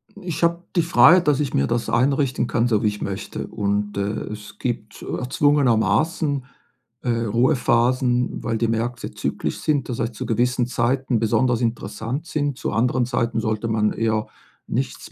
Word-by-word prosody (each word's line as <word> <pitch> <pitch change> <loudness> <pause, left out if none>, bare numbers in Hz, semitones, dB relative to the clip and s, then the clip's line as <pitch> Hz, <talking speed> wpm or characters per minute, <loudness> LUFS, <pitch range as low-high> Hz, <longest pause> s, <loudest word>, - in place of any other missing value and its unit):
Ich 180 -5 -5
habe 170 +1 +2
die 170 - +4
Freiheit, 170 +1 +6
dass 145 -2 +3
ich 145 -3 -1
mir 70 0 +2
das 120 0 -1
einrichten 130 +1 +1
kann, 120 0 +1
so 110 -2 +1
wie - - +3
ich 105 0 -3
möchte. 100 -1 -4
Und, 105 0 -2
äh, - - +1 0.3
es 105 -1 -9
gibt 115 -4 -4
erzwungenermaßen, 145 +2 +1 0.6
äh, 125 - -3 0.2
Ruhephasen, 125 +2 +2
weil 115 -1 -1
die 115 +1 +1
Märkte 120 +2 -2
zyklisch - - -3
sind, 150 -3 0
das 120 - -3
heißt, 115 0 -2
zu - - -5
gewissen 120 +1 +1
Zeiten 125 0 0
besonders 120 +2 +2
interessant 115 +4 -3
sind. 145 -4 -1
Zu - - -3
anderen 125 +1 +1
Zeiten 120 -1 -1
sollte 110 +1 -1
man 110 -1 +1
eher 110 -1 0 0.4
nichts - - -3
120 Hz, 165 wpm, -22 LUFS, 110-135 Hz, 0.6 s, Freiheit